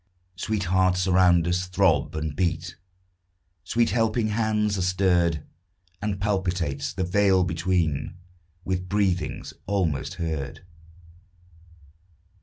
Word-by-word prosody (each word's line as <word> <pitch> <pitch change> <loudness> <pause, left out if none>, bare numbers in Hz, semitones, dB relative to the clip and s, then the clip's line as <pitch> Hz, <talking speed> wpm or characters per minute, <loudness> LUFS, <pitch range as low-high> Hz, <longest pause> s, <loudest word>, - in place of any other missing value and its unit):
Sweet 105 +3 -2
hearts 90 0 +2
around 90 -2 +4
us 90 +1 0
throb 90 -6 +2
and 80 -1 -3
beat, 85 -1 -1 0.9
Sweet 115 -2 +1
helping 115 0 +1
hands 105 -1 +1
are - - -1
stirred, 90 -4 +2 0.6
And 100 -2 -2
palpitates 90 -8 -1
the 90 +4 -2
veil 95 0 +3
between 85 -3 -1 0.5
With 90 -1 -2
breathings 95 -5 -1
almost 90 -8 -1
heard. 80 -2 -4
90 Hz, 100 wpm, -25 LUFS, 85-100 Hz, 0.9 s, around